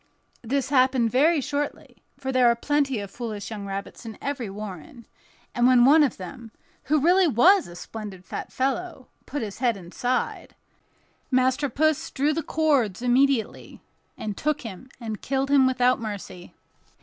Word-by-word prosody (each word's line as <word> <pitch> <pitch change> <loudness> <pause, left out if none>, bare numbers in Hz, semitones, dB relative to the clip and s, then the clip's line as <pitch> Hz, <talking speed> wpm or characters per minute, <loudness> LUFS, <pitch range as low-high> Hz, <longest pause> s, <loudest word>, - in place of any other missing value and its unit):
This 265 +3 -1
happened 255 -4 +3
very 300 +5 +4
shortly, 290 +1 -4 0.2
for 265 -1 -4
there 255 -2 +4
are 235 - +3
plenty 280 0 0
of 200 -2 -6
foolish 220 -3 -6
young 205 -2 -6
rabbits 195 +3 -6
in 225 -2 -8
every 270 -6 -4
warren; 200 +1 -9 0.5
and 240 -1 +3
when 250 -1 +6
one 305 +4 +7
of 290 - +1
them, 210 +5 -9 0.4
who 305 +3 +2
really 355 +5 +4
was 345 - +5
a 175 - -11
splendid 195 -1 -8
fat - - -6
fellow, 270 +2 -3 0.2
put 290 -3 -3
his 205 -1 -7
head 240 -4 +1
inside, 220 +8 -3 0.7
Master 260 +2 +2
Puss 310 +4 +1
drew 290 +3 0
the 325 - -1
cords 280 -10 +1
immediately, 250 -1 +1 0.4
and 210 -2 -4
took 300 +5 -1
him 225 +2 -9
and 220 -4 -6
killed 270 +1 -1
him 270 -2 +5
without 255 -1 +2
mercy. 200 -5 -7
255 Hz, 160 wpm, -25 LUFS, 220-280 Hz, 0.7 s, one